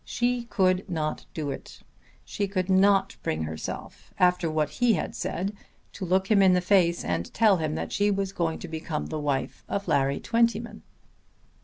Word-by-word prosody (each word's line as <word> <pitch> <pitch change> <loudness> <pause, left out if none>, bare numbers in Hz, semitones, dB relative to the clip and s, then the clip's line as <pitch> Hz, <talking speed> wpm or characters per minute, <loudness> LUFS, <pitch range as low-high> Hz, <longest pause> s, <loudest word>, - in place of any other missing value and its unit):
She 245 0 -1
could 190 -4 +1
not 155 -3 -3
do 150 -3 -3
it. - - -9 0.4
She 200 - -2
could 190 -1 -1
not 195 0 +4
bring 80 0 -2
herself, 80 0 -7
after 180 -2 +3
what 155 -1 0
he 245 -2 +5
had - - -3
said, 195 +4 -3 0.4
to 190 - -5
look 190 +3 +1
him 205 -2 +6
in 190 -1 +6
the 180 - +4
face 180 -2 +2
and 85 0 -2
tell 215 -4 +5
him 155 -2 -2
that - - -4
she 205 +1 +2
was 195 -1 -1
going 165 -3 -1
to - - -7
become 160 -1 -4
the 155 - -4
wife 145 -2 -2
of 200 -1 -2
Larry 140 -3 +2
Twentyman. 230 0 0
185 Hz, 180 wpm, -26 LUFS, 155-200 Hz, 0.4 s, him